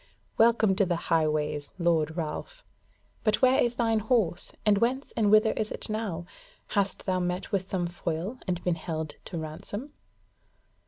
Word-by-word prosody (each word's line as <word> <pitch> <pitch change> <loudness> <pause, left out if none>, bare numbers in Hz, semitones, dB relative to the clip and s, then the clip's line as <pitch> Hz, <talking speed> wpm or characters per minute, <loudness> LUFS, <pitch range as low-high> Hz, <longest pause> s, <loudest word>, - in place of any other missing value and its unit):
Welcome 225 -3 +4
to 200 - +4
the 175 - +1
Highways, 150 -3 0
Lord 165 -2 +1
Ralph! 340 - -4 0.6
But 215 +3 +2
where 260 +2 +6
is 240 0 +1
thine 225 -2 +2
horse? 215 -6 0
and 205 -2 +4
whence 255 +5 0
and 215 -3 +3
whither 215 +1 +6
is 215 -1 -2
it - - -4
now? 200 -6 -3 0.4
Hast 200 -2 0
thou 185 -1 +1
met 180 0 -2
with 195 - +2
some 185 -1 -2
foil 175 +6 -3
and 180 -1 -1
been 180 - +2
held 160 -1 -4
to 175 - -5
ransom?" 200 - -6
190 Hz, 160 wpm, -28 LUFS, 165-225 Hz, 0.6 s, where